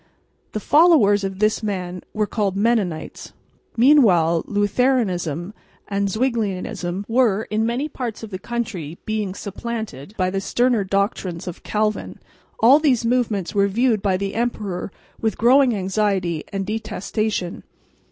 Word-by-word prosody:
The 215 - -2
followers 275 - +5
of 195 -1 -3
this 215 +2 +1
man 185 -4 -4
were 215 -1 0
called 205 -3 -1
Mennonites. 205 -7 -1 0.4
Meanwhile 195 - +5
Lutheranism 205 - 0 0.3
and 200 0 -1
Zwinglianism 200 -5 -2
were 225 -3 +2
in 220 +1 +1
many 250 +6 -1
parts 245 -7 -5
of 220 - -8
the 185 - -5
country 190 -9 -4
being 210 -3 -2
supplanted 210 - -6
by 185 -1 +1
the 195 0 -2
sterner 240 +1 +1
doctrines 195 -3 -2
of 175 - -6
Calvin. 215 0 -2 0.4
All 260 +6 +7
these 260 -7 +2
movements 230 -7 0
were 200 0 +3
viewed 225 +1 +1
by 190 -2 +1
the 195 +1 -3
emperor 210 -6 -3 0.3
with 220 -2 0
growing 250 +1 +5
anxiety 190 -4 -1
and 195 -1 -2
detestation. 215 -3 -3
210 Hz, 130 wpm, -21 LUFS, 190-235 Hz, 0.4 s, All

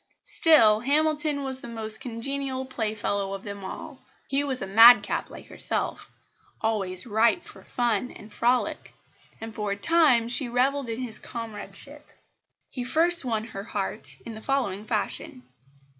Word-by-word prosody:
Still 225 -10 +5
Hamilton 295 +2 +1
was 265 -1 -3
the - - -9
most 220 -2 -1
congenial 265 +2 -4
playfellow 210 -5 -3
of 195 - -7
them 200 -1 -8
all. 190 - -8 0.3
He 275 +1 0
was 265 -3 -3
a - - -4
madcap 225 +5 +6
like - - -11
herself, - - -3 0.5
always 195 -5 +2
ripe 230 +8 +2
for - - -12
fun 240 -1 -1
and 210 0 -14
frolic; 245 +3 -1 0.4
and 225 0 -8
for 210 -1 -4
a - - -4
time 260 -1 +3
she 245 +1 +2
revelled 260 +2 0
in 225 +2 -4
his 230 -4 -5
comradeship. 230 +6 -8 0.6
He 250 - -6
first 330 +4 +4
won 220 -3 -1
her 210 -4 -7
heart 190 -10 -5
in 230 - -7
the 220 - -10
following 220 -7 -2
fashion. 210 - -3
235 Hz, 150 wpm, -25 LUFS, 210-270 Hz, 0.6 s, madcap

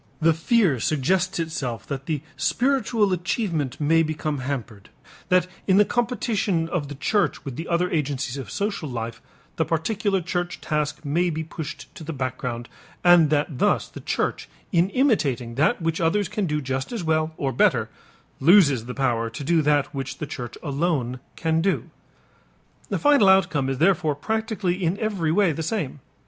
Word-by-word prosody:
The 165 +1 +4
fear 165 - +2
suggests 175 - +1
itself 135 -9 -3
that 135 -1 -5
the 155 -3 -2
spiritual 235 -6 +1
achievement 170 - -2
may 160 +2 +4
become 155 -2 -2
hampered, 125 -6 -5 0.4
that 180 -2 +4 0.2
in 190 -1 +5
the 210 - +6
competition 215 -8 0
of 165 -4 -2
the 145 - -7
church 205 +9 0
with 135 -3 -5
the 165 - -5
other 175 +1 +1
agencies 140 -4 -1
of 135 -7 -6
social 200 - -2
life 115 -2 -5 0.4
the 160 - +3
particular 195 +5 0
church 175 0 -3
task 150 0 -2
may 170 +5 +1
be 160 -1 -3
pushed 160 0 -8
to 165 - -10
the 160 +1 -5
background, 130 -3 -4 0.4
and 175 -3 +6
that 145 -2 0
thus - - +2
the - - -9
church - - -2 0.2
in 175 +2 +3
imitating 150 - +1
that 155 - +1
which 165 0 0
others 185 +4 +2
can 205 0 -2
do 150 -1 -1
just 130 - -3
as 230 -6 -3
well 160 0 0
or 135 -1 -1
better - - +3 0.5
loses 145 - +5
the 125 - -6
power 120 -4 0
to 140 +6 -7
do 165 +3 +3
that 145 -1 +1
which 135 -1 -4
the - - -4
church 120 -4 -7
alone 140 -5 -1 0.2
can 160 0 +1
do. 195 +3 -1 1.0
The - - 0
final 285 -9 +5
outcome 175 -8 +3
is 135 - -1
therefore 160 -2 +2
practically 200 +1 -2
in 175 +3 +1
every 200 -8 -1
way 190 0 +3
the 160 - -4
same. 160 - -3
160 Hz, 170 wpm, -24 LUFS, 140-185 Hz, 1.0 s, the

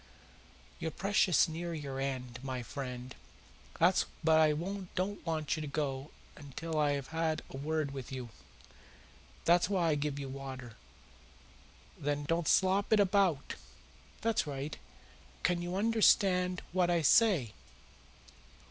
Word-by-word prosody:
"You're 160 - -2
precious 190 -1 +3
near 170 +1 -4
your 140 -3 -5
end, 130 -3 -3
my 130 -2 -4
friend, 125 0 -6 0.7
but 175 +3 +4 0.2
I 160 -1 +5 0.4
don't 195 +3 -2
want 155 -2 0
you 155 - -4
to 150 - -4
go 140 -1 -3 0.5
till 165 -2 -2
I 145 -1 +3
have 140 -2 -4
had 160 -1 -1
a - - -6
word 155 0 -1
with 135 -2 -7
you. 130 -3 -5 1.2
That's 175 +2 +4
why 180 -5 +2
I - - +3
give 145 -1 -2
you 140 -1 -4
water. 130 -3 -7 1.3
There, 145 +1 0
don't 160 +3 -1
slop 190 +2 +3
it 215 - +5
about! 190 -7 +2 0.7
That's 225 -7 +1
right. 140 +1 -4 0.7
Can 175 -1 +1
you 175 +1 -3
understand 195 -4 +3
what 180 0 +2
I 170 -2 +2
say?" 170 - +4
155 Hz, 130 wpm, -32 LUFS, 135-180 Hz, 1.3 s, I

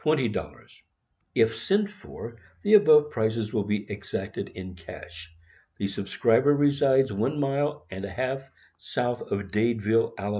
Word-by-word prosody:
00 135 -8 -1 0.7
If 115 0 +3
sent 200 - +1
for, 115 - -11 0.2
the 205 - +2
above 150 -8 +7
prices 110 -1 -1
will 105 -3 0
be 105 0 -1
exacted - - -5
in 95 0 -7
cash. 85 0 -11 0.5
The 100 - -1
subscriber 115 +8 +2
resides 140 -4 +3
one 130 +9 -1
mile 145 +1 -1
and 95 +1 -6
a 100 - -4
half 130 +5 -3 0.3
south 120 -1 -2
of 100 -1 -4
Dadeville, 115 0 +1
Ala. 100 0 -3
115 Hz, 140 wpm, -26 LUFS, 105-140 Hz, 0.7 s, above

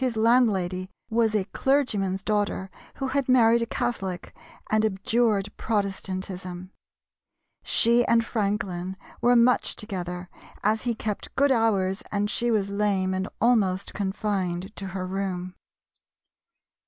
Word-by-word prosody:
His 245 -3 0
landlady 200 -6 +2 0.2
was 225 -1 +2
a 205 - +2
clergyman's 205 -4 0
daughter, 205 -2 -1 0.2
who 270 -1 -3
had 275 -1 0
married 235 -2 +5
a 230 - -1
Catholic, 195 -8 -3 0.3
and 215 0 +2
abjured 210 0 +1
Protestantism. 190 -3 -3 0.9
She 235 +1 +3
and 230 -1 +3
Franklin 195 -4 -2 0.2
were 245 +1 +5
much 245 +1 +3
together, 180 -4 -5 0.4
as 215 +3 +1
he 235 - 0
kept 215 -2 -5
good 280 0 +3
hours 200 -5 +2
and 205 0 0
she 240 - 0
was 205 -3 +1
lame 200 -2 +1
and 190 +1 -2
almost 200 -5 +2
confined 190 -1 -2
to 195 - -5
her 185 0 -4
room. 185 -1 -3
205 Hz, 125 wpm, -26 LUFS, 190-230 Hz, 0.9 s, married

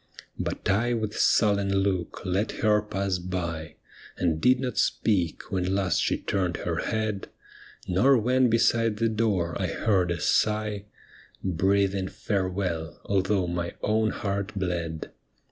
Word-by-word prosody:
But - - -3
I 120 +5 +2
with 110 -2 -3
sullen 100 -2 +3
look 95 -2 -2
let 95 +4 0
her 105 -1 +4
pass 100 -3 -2
by. 85 -3 -4 0.4
And 80 -3 0
did 125 0 +4
not 130 -1 -2
speak 90 -7 0
when 95 0 0
last 95 -3 +1
she - - +1
turned 90 -3 -1
her - - -3
head. 110 -2 -2 0.6
Nor 125 +10 +4
when 125 +2 +3
beside 115 -1 +2
the 115 +1 +2
door 105 -7 0
I - - +1
heard 95 -5 +1
a 85 -1 -1
sigh 105 +3 +1 0.6
Breathing 95 +1 +1
farewell, 90 -6 -2
although 95 -1 +1
my 85 0 -3
own 110 +1 +2
heart 100 -1 -3
bled. 85 -4 -3
100 Hz, 135 wpm, -26 LUFS, 90-110 Hz, 0.6 s, her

